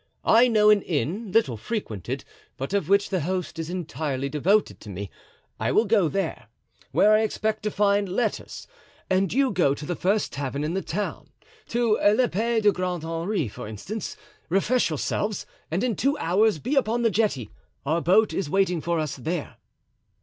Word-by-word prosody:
I 235 Hz, +3 st, +6 dB
know 215 Hz, -3 st, +5 dB
an 210 Hz, -1 st, +4 dB
inn, 180 Hz, -, -2 dB
little 190 Hz, -, +2 dB
frequented, 110 Hz, -, -4 dB, 0.3 s
but 135 Hz, +8 st, -4 dB
of 200 Hz, -1 st, 0 dB
which 200 Hz, +1 st, +3 dB
the 190 Hz, -, +1 dB
host 175 Hz, 0 st, -3 dB
is 165 Hz, 0 st, -4 dB
entirely 150 Hz, -6 st, -3 dB
devoted 185 Hz, +9 st, +1 dB
to 105 Hz, -, -11 dB
me. 100 Hz, 0 st, -6 dB, 0.5 s
I -, -, 0 dB
will 220 Hz, -, +3 dB
go 205 Hz, -5 st, +3 dB
there, 195 Hz, +3 st, -3 dB, 0.4 s
where 215 Hz, -, +5 dB
I 215 Hz, -, +5 dB
expect 220 Hz, 0 st, -1 dB
to 210 Hz, -, -1 dB
find 200 Hz, -1 st, +2 dB
letters, 215 Hz, +4 st, -2 dB, 0.5 s
and 185 Hz, -1 st, +2 dB
you 265 Hz, 0 st, +2 dB
go 140 Hz, -6 st, +2 dB
to 150 Hz, -, -8 dB
the 175 Hz, -, -2 dB
first 195 Hz, +7 st, 0 dB
tavern 140 Hz, 0 st, -3 dB
in 155 Hz, +3 st, -2 dB
the 190 Hz, -, -1 dB
town, 205 Hz, +4 st, -4 dB, 0.4 s
to 230 Hz, -2 st, +2 dB
L'Epee 225 Hz, +1 st, +2 dB
du 210 Hz, -1 st, +5 dB
Grand 180 Hz, -3 st, -3 dB
Henri 165 Hz, -, -2 dB
for 105 Hz, -, -8 dB
instance, 185 Hz, -, -6 dB, 0.3 s
refresh 205 Hz, +7 st, +2 dB
yourselves, 200 Hz, +6 st, -2 dB, 0.2 s
and 175 Hz, +7 st, -1 dB
in 245 Hz, -4 st, 0 dB
two 280 Hz, +7 st, +1 dB
hours 195 Hz, +3 st, +2 dB
be 255 Hz, -, -2 dB
upon 240 Hz, -3 st, +1 dB
the 230 Hz, -, +3 dB
jetty; 185 Hz, -, 0 dB, 0.3 s
our 160 Hz, +4 st, +1 dB
boat 205 Hz, +6 st, +4 dB
is 190 Hz, -6 st, -2 dB
waiting 180 Hz, -2 st, +1 dB
for 170 Hz, +1 st, -1 dB
us 155 Hz, -3 st, -2 dB
there." 160 Hz, +4 st, -4 dB
195 Hz, 180 wpm, -25 LUFS, 160-215 Hz, 0.5 s, I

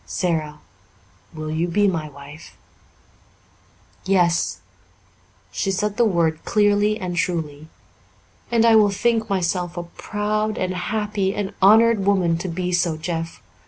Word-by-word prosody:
"Sara, 155 Hz, -4 st, -2 dB, 0.7 s
will 155 Hz, -1 st, -6 dB
you 160 Hz, +2 st, -1 dB
be 205 Hz, +4 st, +2 dB
my 160 Hz, -5 st, -2 dB
wife?" 145 Hz, +2 st, -13 dB, 1.5 s
"Yes." 175 Hz, -3 st, +1 dB, 0.9 s
She 100 Hz, -, -2 dB
said 205 Hz, +2 st, -1 dB
the 240 Hz, -, +4 dB
word 165 Hz, -6 st, 0 dB
clearly 210 Hz, 0 st, +2 dB
and 180 Hz, -2 st, -4 dB
truly. 155 Hz, -4 st, -3 dB, 0.8 s
"And 230 Hz, -1 st, +3 dB
I 230 Hz, -1 st, +6 dB
will 210 Hz, -2 st, +5 dB
think 225 Hz, +3 st, 0 dB
myself 180 Hz, -2 st, -1 dB
a 175 Hz, -, -3 dB
proud 210 Hz, +4 st, -3 dB
and 185 Hz, 0 st, -2 dB
happy 205 Hz, +1 st, -2 dB
and 200 Hz, -2 st, -3 dB
honoured 220 Hz, +1 st, +5 dB
woman 185 Hz, -4 st, +2 dB
to 185 Hz, -, -4 dB
be 180 Hz, +1 st, -3 dB
so, 175 Hz, -2 st, 0 dB
Jeff. 165 Hz, 0 st, -5 dB
185 Hz, 130 wpm, -22 LUFS, 165-210 Hz, 1.5 s, I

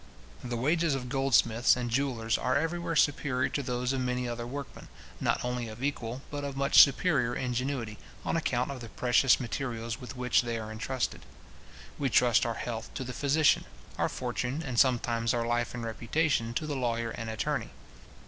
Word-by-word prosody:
The 120 Hz, -1 st, -3 dB
wages 155 Hz, +4 st, +2 dB
of 125 Hz, -2 st, -5 dB
goldsmiths 120 Hz, -3 st, +3 dB
and 120 Hz, -1 st, -3 dB
jewellers 115 Hz, -3 st, 0 dB
are 130 Hz, +2 st, +1 dB
everywhere 165 Hz, +2 st, -1 dB
superior 140 Hz, -3 st, +2 dB
to 145 Hz, -, -2 dB
those 125 Hz, 0 st, -1 dB
of 130 Hz, -, -1 dB
many 125 Hz, 0 st, -1 dB
other 120 Hz, 0 st, -4 dB
workmen, 140 Hz, +2 st, -7 dB, 0.3 s
not -, -, 0 dB
only 125 Hz, -1 st, -2 dB
of 110 Hz, +3 st, -8 dB
equal, 130 Hz, -2 st, -3 dB
but 145 Hz, -1 st, -4 dB
of 140 Hz, -1 st, -4 dB
much 140 Hz, +1 st, +7 dB
superior 140 Hz, -4 st, +3 dB
ingenuity, 125 Hz, -3 st, -2 dB, 0.3 s
on -, -, 0 dB
account 130 Hz, -5 st, 0 dB
of 130 Hz, -3 st, -7 dB
the 115 Hz, -, -8 dB
precious 125 Hz, +2 st, +3 dB
materials 115 Hz, -2 st, -4 dB
with 125 Hz, +2 st, -8 dB
which 125 Hz, -1 st, +3 dB
they 120 Hz, -1 st, -3 dB
are 110 Hz, -1 st, -6 dB
entrusted. 125 Hz, +3 st, -3 dB, 0.8 s
We 140 Hz, -2 st, +1 dB
trust 120 Hz, -1 st, +4 dB
our 115 Hz, -, -2 dB
health 115 Hz, -2 st, -5 dB
to -, -, -3 dB
the 125 Hz, 0 st, -6 dB
physician, 145 Hz, +3 st, +3 dB, 0.3 s
our -, -, +2 dB
fortune, 125 Hz, +4 st, -3 dB
and 125 Hz, -4 st, -1 dB
sometimes 120 Hz, -2 st, +2 dB
our 115 Hz, -1 st, 0 dB
life 120 Hz, +1 st, -1 dB
and 120 Hz, -, -5 dB
reputation, 115 Hz, +1 st, 0 dB
to 155 Hz, -, -1 dB
the 150 Hz, -2 st, -3 dB
lawyer 115 Hz, -3 st, -1 dB
and 115 Hz, 0 st, -5 dB
attorney. 110 Hz, -, -2 dB
125 Hz, 180 wpm, -29 LUFS, 120-140 Hz, 0.8 s, much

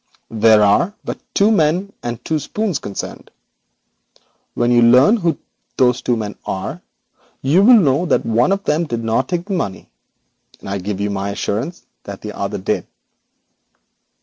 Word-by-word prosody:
There 110 Hz, -1 st, +5 dB
are 170 Hz, -, +2 dB
but -, -, -5 dB, 0.2 s
two 205 Hz, +2 st, +4 dB
men 185 Hz, +2 st, +1 dB
and 120 Hz, 0 st, -6 dB
two 160 Hz, -1 st, 0 dB
spoons 195 Hz, +1 st, -2 dB
concerned. 100 Hz, -, -7 dB, 1.3 s
When 120 Hz, 0 st, +1 dB
you 120 Hz, 0 st, +5 dB
learn 125 Hz, -, +6 dB
who 170 Hz, -7 st, 0 dB, 0.4 s
those 125 Hz, -1 st, +3 dB
two 120 Hz, -, 0 dB
men 105 Hz, -2 st, -5 dB
are, 135 Hz, -, -5 dB, 0.6 s
you 150 Hz, +8 st, +4 dB
will 235 Hz, +4 st, +7 dB
know 155 Hz, -2 st, +2 dB
that -, -, +1 dB
one 115 Hz, +9 st, +2 dB
of 195 Hz, 0 st, 0 dB
them 155 Hz, +3 st, 0 dB
did 120 Hz, -6 st, -4 dB
not 115 Hz, +3 st, 0 dB
take 175 Hz, -1 st, -2 dB
the 200 Hz, -, -4 dB
money, 100 Hz, -, -4 dB, 0.7 s
and -, -, -12 dB
I 100 Hz, 0 st, -3 dB
give 100 Hz, +1 st, -4 dB
you 100 Hz, 0 st, -1 dB
my 100 Hz, 0 st, -3 dB
assurance 115 Hz, -, -4 dB, 0.2 s
that -, -, -8 dB
the -, -, -7 dB
other -, -, -3 dB
did.' -, -, -2 dB
130 Hz, 165 wpm, -18 LUFS, 110-175 Hz, 1.3 s, will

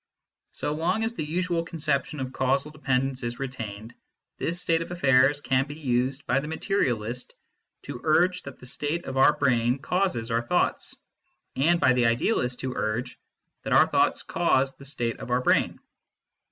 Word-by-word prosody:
So 150 Hz, -, -2 dB
long 180 Hz, +8 st, 0 dB
as 225 Hz, +1 st, -1 dB
the 195 Hz, -, -4 dB
usual 170 Hz, +2 st, -1 dB
conception 150 Hz, -3 st, -2 dB
of 130 Hz, 0 st, -4 dB
causal 135 Hz, +3 st, 0 dB
dependence 135 Hz, -3 st, -1 dB
is 120 Hz, 0 st, -4 dB
re 135 Hz, 0 st, -3 dB
tained, 110 Hz, -3 st, -7 dB, 0.5 s
this 170 Hz, +1 st, -2 dB
state 165 Hz, -2 st, +1 dB
of 165 Hz, -, -5 dB
affairs 140 Hz, -4 st, +3 dB
can 135 Hz, 0 st, +1 dB
be 145 Hz, -, -7 dB
used 130 Hz, -1 st, -1 dB
by 125 Hz, +3 st, +2 dB
the 145 Hz, -, -6 dB
materialist 125 Hz, -, -1 dB, 0.5 s
to 120 Hz, -, -7 dB
urge 180 Hz, +4 st, +3 dB
that 140 Hz, -2 st, -10 dB
the -, -, -13 dB
state 150 Hz, +6 st, -1 dB
of 135 Hz, -, -5 dB
our 135 Hz, -, +5 dB
brain 125 Hz, -2 st, +2 dB
causes 165 Hz, -6 st, -1 dB
our 115 Hz, +1 st, +2 dB
thoughts, 120 Hz, -, 0 dB, 0.6 s
and 170 Hz, +6 st, +3 dB
by 130 Hz, -, +4 dB
the 125 Hz, -2 st, +3 dB
idealist 125 Hz, -, 0 dB
to 130 Hz, -1 st, -3 dB
urge 115 Hz, +4 st, -3 dB, 0.4 s
that -, -, -2 dB
our -, -, +7 dB
thoughts -, -, +1 dB
cause 135 Hz, 0 st, +1 dB
the 140 Hz, -, -13 dB
state 120 Hz, -5 st, -2 dB
of -, -, -8 dB
our 125 Hz, +1 st, +2 dB
brain. -, -, +2 dB
135 Hz, 175 wpm, -26 LUFS, 125-160 Hz, 0.6 s, our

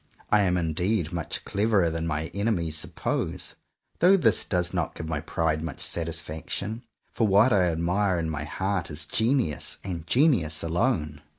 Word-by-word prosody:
I 105 Hz, -, +5 dB
am 90 Hz, -2 st, +2 dB
indeed 85 Hz, +2 st, 0 dB
much 85 Hz, -2 st, -4 dB
cleverer 100 Hz, -4 st, +2 dB
than 80 Hz, 0 st, -2 dB
my 80 Hz, 0 st, -2 dB
enemies 100 Hz, -7 st, 0 dB
suppose; 80 Hz, -, -3 dB, 0.5 s
though 185 Hz, +3 st, +6 dB
this 115 Hz, -, +2 dB
does 90 Hz, -1 st, -1 dB
not 85 Hz, -3 st, -1 dB
give 80 Hz, -, -6 dB
my 80 Hz, -2 st, -1 dB
pride 80 Hz, 0 st, -1 dB
much 80 Hz, -3 st, -5 dB
satisfaction, 85 Hz, +6 st, -3 dB, 0.3 s
for 110 Hz, -, +2 dB
what 105 Hz, +5 st, +5 dB
I 95 Hz, -3 st, +4 dB
admire 90 Hz, +3 st, +1 dB
in 85 Hz, -1 st, -1 dB
my 75 Hz, -2 st, -3 dB
heart 95 Hz, +4 st, -2 dB
is 75 Hz, +1 st, -4 dB
genius, 115 Hz, -, 0 dB
and 85 Hz, -4 st, -5 dB
genius 120 Hz, -, +2 dB
alone. 85 Hz, -, 0 dB
85 Hz, 160 wpm, -26 LUFS, 80-105 Hz, 0.5 s, though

